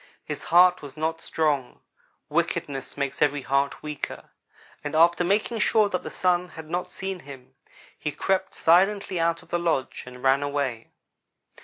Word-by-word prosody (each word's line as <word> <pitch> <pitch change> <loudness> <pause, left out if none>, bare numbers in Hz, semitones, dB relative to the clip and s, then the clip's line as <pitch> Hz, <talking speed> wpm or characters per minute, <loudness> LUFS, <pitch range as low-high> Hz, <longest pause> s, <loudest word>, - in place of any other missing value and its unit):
His - - -6
heart 180 +1 +5
was 145 0 -10
not 160 +1 -2
strong 145 -5 -1 0.5
wickedness 135 -1 -2
makes 140 -1 -3
every 145 -1 +2
heart 140 +2 0
weaker 150 -2 -6 0.5
and 145 +1 -4
after 170 +2 +5
making 210 +5 0
sure 215 -1 +3
that 180 - -2
the - - -6
Sun 180 -1 +1
had 160 -2 -10
not 175 +3 -3
seen 190 -1 -5
him, 135 -3 -12 0.5
he 150 - -2
crept 190 +4 -1
silently 190 +2 +3
out 165 0 0
of - - -22
the 175 - 0
lodge 165 -6 -1
and 125 0 -11
ran 135 +1 +4
away. 140 -5 -2
160 Hz, 160 wpm, -25 LUFS, 140-180 Hz, 0.5 s, heart